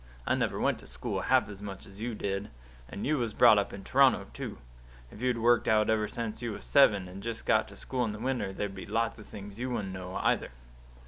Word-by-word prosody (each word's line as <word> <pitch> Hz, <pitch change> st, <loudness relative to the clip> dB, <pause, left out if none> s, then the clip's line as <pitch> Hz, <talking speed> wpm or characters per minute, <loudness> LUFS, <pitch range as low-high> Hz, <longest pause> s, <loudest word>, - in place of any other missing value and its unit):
I -, -, +2 dB
never -, -, 0 dB
went -, -, +1 dB
to -, -, -13 dB
school -, -, -3 dB
half -, -, +3 dB
as 100 Hz, -1 st, -9 dB
much 100 Hz, -2 st, -7 dB
as 95 Hz, 0 st, -14 dB
you 120 Hz, 0 st, -2 dB
did; 100 Hz, 0 st, -3 dB, 0.4 s
and 100 Hz, -, -5 dB
you 150 Hz, 0 st, +1 dB
was 115 Hz, -3 st, -2 dB
brought 110 Hz, -2 st, +7 dB
up 100 Hz, -, -2 dB
in 100 Hz, -, -8 dB
Toronto, -, -, +4 dB
too. -, -, -6 dB, 0.5 s
If 105 Hz, -, -12 dB
you'd 125 Hz, -1 st, +1 dB
worked 120 Hz, +1 st, +3 dB
out 110 Hz, 0 st, +4 dB
ever 110 Hz, -1 st, +1 dB
since 115 Hz, 0 st, -5 dB
you 120 Hz, -2 st, -3 dB
was -, -, -8 dB
seven, 95 Hz, -, +5 dB
and 95 Hz, +2 st, -9 dB
just 115 Hz, 0 st, -5 dB
got 110 Hz, 0 st, +3 dB
to 100 Hz, -, -12 dB
school 125 Hz, +4 st, -2 dB
in 110 Hz, -, -2 dB
the 105 Hz, -, -6 dB
winter, 125 Hz, -3 st, -1 dB
there'd 100 Hz, +1 st, -3 dB
be -, -, -8 dB
lots 115 Hz, 0 st, -1 dB
of 105 Hz, -, -12 dB
things 100 Hz, 0 st, -9 dB
you 130 Hz, +1 st, -2 dB
wouldn't 100 Hz, -6 st, -3 dB
know, 95 Hz, 0 st, -6 dB
either." -, -, +1 dB
105 Hz, 245 wpm, -30 LUFS, 100-115 Hz, 0.5 s, brought